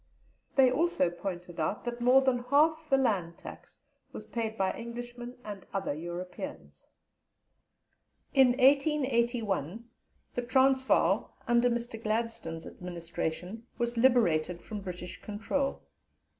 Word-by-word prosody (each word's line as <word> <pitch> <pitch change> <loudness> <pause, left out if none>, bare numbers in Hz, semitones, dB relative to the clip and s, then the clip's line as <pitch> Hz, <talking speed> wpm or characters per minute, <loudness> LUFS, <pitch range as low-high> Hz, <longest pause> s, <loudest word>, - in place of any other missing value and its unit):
They 260 -2 +6
also 260 - +2
pointed 175 -1 -6
out 160 +9 -1
that 240 0 -4
more 255 +2 +6
than 260 -2 +2
half 310 +4 +3
the 270 - +5
land 190 -10 0
tax - - -11 0.3
was - - -8
paid 225 -1 -3
by 190 -1 +1
Englishmen 240 +1 -7
and 205 -3 -7
other 195 -6 -1
Europeans. 175 +3 -7 1.5
In 265 -3 +6
1881, 240 - +2 0.5
the 245 - -1
Transvaal 260 +2 +3
(under 240 +1 +4
Mr. 235 -1 -3
Gladstone's 220 -7 -2
administration) 180 +4 -5
was 240 0 -1
liberated 180 -9 +3
from 210 -2 -6
British 180 -2 -7
control. 225 +7 -2
235 Hz, 115 wpm, -30 LUFS, 180-255 Hz, 1.5 s, They